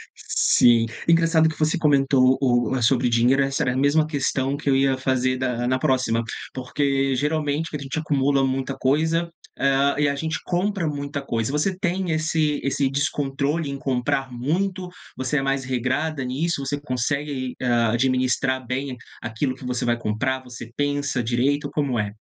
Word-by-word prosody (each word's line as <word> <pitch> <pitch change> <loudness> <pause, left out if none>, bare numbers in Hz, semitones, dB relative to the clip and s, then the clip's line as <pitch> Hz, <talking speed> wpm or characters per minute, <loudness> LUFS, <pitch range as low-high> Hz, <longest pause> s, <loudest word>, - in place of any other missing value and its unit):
Sim. 120 -1 +3 0.2
Engraçado 165 -1 +4
que 160 - -8
você 155 +3 +1
comentou 135 -4 +3
o 120 -1 +2
eh, 130 - -1
sobre 125 +1 +3
dinheiro, 120 +3 +3
essa 135 +2 -1
era 125 -3 0
a - - -3
mesma 145 +3 +3
questão 140 -2 -1
que 145 - -2
eu 135 - +4
ia 135 0 +2
fazer 130 -1 0
da 125 -2 -1
na 130 +1 +1
próxima, 130 -5 +1 0.3
porque 135 +1 0
geralmente 150 +3 -1
a - - -3
gente 135 +3 -3
acumula 140 -2 +1
muita 135 +1 -2
coisa, 160 +5 +1 0.3
hã, 140 +1 +2
e 145 0 +2
a 140 - 0
gente 160 +3 -3
compra 185 0 0
muita 145 -1 -4
coisa. 115 -3 -2
Você 165 +6 0
tem 185 -1 -1
esse 155 -1 0
esse 135 0 +1
descontrole 140 +2 -1
em 140 - -4
comprar 135 0 -1
muito, 180 +9 -2 0.3
você 130 +3 -1
é - - +1
mais 135 0 -1
regrada 130 +4 -1
nisso, 140 +3 -2
você 145 +1 -2
consegue 145 +2 -2
aí, 130 -2 -4
hã, 120 -3 +2
administrar 130 +1 +1
bem 130 +1 -3 0.2
aquilo 120 +4 -2
que 130 - -11
você 125 -1 -2
vai 120 0 +1
comprar, 130 +4 -2
você 120 -2 -10
pensa 145 -3 -1
direito, 135 +5 0
como 140 -5 -1
é? 105 -1 -2
135 Hz, 170 wpm, -23 LUFS, 130-150 Hz, 0.3 s, Engraçado